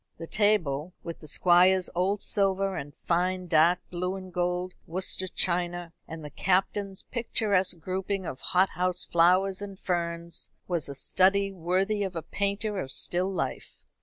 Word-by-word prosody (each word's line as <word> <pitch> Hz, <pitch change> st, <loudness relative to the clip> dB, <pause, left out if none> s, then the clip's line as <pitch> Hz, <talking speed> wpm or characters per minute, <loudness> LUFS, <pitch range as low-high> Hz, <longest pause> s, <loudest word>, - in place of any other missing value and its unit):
The 165 Hz, -, -6 dB
table, 180 Hz, -6 st, +1 dB
with 170 Hz, -1 st, -6 dB
the 155 Hz, -, -12 dB
Squire's 180 Hz, +3 st, +4 dB
old 195 Hz, +3 st, 0 dB
silver, 195 Hz, -1 st, +1 dB
and 145 Hz, +1 st, -5 dB
fine 180 Hz, +2 st, 0 dB
dark 170 Hz, +1 st, +4 dB
blue 180 Hz, +1 st, -2 dB
and 185 Hz, -1 st, -9 dB
gold 180 Hz, +1 st, -1 dB
Worcester 185 Hz, +2 st, -1 dB
china, 175 Hz, -1 st, 0 dB
and 160 Hz, -1 st, -8 dB
the 150 Hz, -, -8 dB
Captain's 195 Hz, +3 st, 0 dB
picturesque 205 Hz, -6 st, 0 dB
grouping 190 Hz, +3 st, -3 dB
of 130 Hz, -, -5 dB
hothouse 180 Hz, -1 st, +1 dB
flowers 185 Hz, +3 st, +3 dB
and 200 Hz, -2 st, -7 dB
ferns, 170 Hz, -1 st, -3 dB, 0.2 s
was 170 Hz, -5 st, -2 dB
a 140 Hz, -, -6 dB
study 195 Hz, +6 st, +2 dB
worthy 190 Hz, +4 st, 0 dB
of 190 Hz, -3 st, -2 dB
a 165 Hz, -, -3 dB
painter 200 Hz, +1 st, -2 dB
of 135 Hz, -7 st, -4 dB
still 180 Hz, +6 st, +1 dB
life. 185 Hz, -, -4 dB
185 Hz, 150 wpm, -28 LUFS, 170-195 Hz, 0.2 s, Squire's